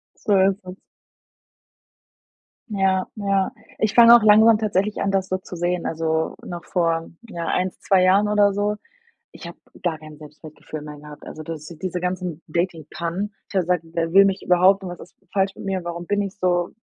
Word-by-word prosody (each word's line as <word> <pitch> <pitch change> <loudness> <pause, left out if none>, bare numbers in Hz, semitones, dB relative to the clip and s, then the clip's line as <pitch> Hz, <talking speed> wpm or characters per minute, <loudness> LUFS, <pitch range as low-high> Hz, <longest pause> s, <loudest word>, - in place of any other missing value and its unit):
So 205 -4 +1
ist 190 +1 +1
es. 185 +1 -9 1.9
Ja, 190 -3 +1
ja. 195 -2 0 0.3
Ich 215 -1 0
fange 235 0 +9
auch 240 - +6
langsam 215 +1 +6
tatsächlich 210 -1 -1
an, 195 - 0
das 190 -1 0
so 185 - -1
zu 185 -1 -10
sehen, 175 +1 -1
also 160 0 -1
noch 175 -1 -7
vor, 165 -2 -1 0.2
ja, 170 -6 -5
1, 185 +1 0
2 190 -2 +3
Jahren 195 +3 +4
oder 205 -1 +3
so. 205 +1 -1 0.6
Ich 170 - -10
habe 170 - -10 0.3
gar 170 -3 -1
kein 155 -1 -12
Selbstwertgefühl 155 0 -10
mehr 150 0 -9
gehabt, 150 0 -12
also 155 - -8
das 155 -1 -7
diese 180 +1 -5
ganzen 180 -3 -3
Dating-Pannen 170 +3 -3
ich - - -13
habe 190 - +3
gesagt: 180 -1 0
„Wer 165 -1 -1
will 195 +1 +8
mich 195 -1 0
überhaupt 185 +2 +4
und 185 - -5
was 175 - -8
ist - - -14 0.2
falsch 195 -1 0
mit - - -10
mir, 190 -2 -2
warum 170 0 -6
bin 205 +3 0
ich 195 -1 -5
so 175 -2 0
185 Hz, 190 wpm, -22 LUFS, 170-195 Hz, 1.9 s, fange